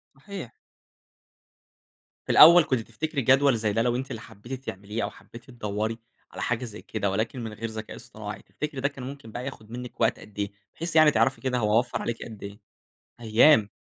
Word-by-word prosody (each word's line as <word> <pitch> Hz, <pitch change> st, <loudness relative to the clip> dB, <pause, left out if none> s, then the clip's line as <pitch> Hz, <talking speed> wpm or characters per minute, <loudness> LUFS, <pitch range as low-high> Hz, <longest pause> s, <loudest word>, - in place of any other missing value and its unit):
صحيح. 175 Hz, -, -8 dB, 1.7 s
في -, -, -1 dB
الأول 170 Hz, +1 st, +10 dB
كنتِ 130 Hz, -4 st, 0 dB
تفتكري 140 Hz, +7 st, -3 dB
جدول 135 Hz, 0 st, +4 dB
زي 110 Hz, -2 st, 0 dB
ده 115 Hz, -, +2 dB
لو 120 Hz, 0 st, +1 dB
أنتِ 135 Hz, +2 st, -3 dB
اللي 115 Hz, -, -5 dB
حبيتِ 125 Hz, +6 st, -9 dB
تعمليه، 100 Hz, +4 st, -4 dB
أو -, -, -1 dB
حبيتِ 120 Hz, +1 st, -14 dB
تدوّري 110 Hz, -2 st, -3 dB, 0.3 s
على -, -, -7 dB
حاجة 120 Hz, +1 st, -1 dB
زي 110 Hz, -2 st, -9 dB
كده 100 Hz, -3 st, -2 dB
ولكن 110 Hz, +5 st, -2 dB
من 110 Hz, -1 st, -5 dB
غير 115 Hz, +1 st, -5 dB
ذكاء 110 Hz, 0 st, -7 dB
اصطناعي، -, -, -8 dB
تفتكري 150 Hz, -3 st, -5 dB
ده 140 Hz, -, +3 dB
كان 140 Hz, -3 st, -8 dB
ممكن 135 Hz, -3 st, -8 dB
بقى 125 Hz, +3 st, -5 dB
ياخُد 110 Hz, -5 st, -8 dB
منِّك 125 Hz, 0 st, -7 dB
وقت 115 Hz, +1 st, +2 dB
قد 105 Hz, -1 st, -12 dB
إيه؟ 100 Hz, 0 st, -1 dB, 0.2 s
بحيث 165 Hz, 0 st, -4 dB
يعني 155 Hz, -1 st, +7 dB
تعرفي 115 Hz, -2 st, +2 dB
كده 130 Hz, -1 st, 0 dB
هو 105 Hz, 0 st, +3 dB
وفّر 125 Hz, -, -3 dB
عليكِ 115 Hz, -, -3 dB
قد 110 Hz, -3 st, -10 dB
إيه؟ 100 Hz, +2 st, -8 dB, 0.6 s
أيام! 110 Hz, 0 st, +5 dB
120 Hz, 195 wpm, -26 LUFS, 110-135 Hz, 1.7 s, الأول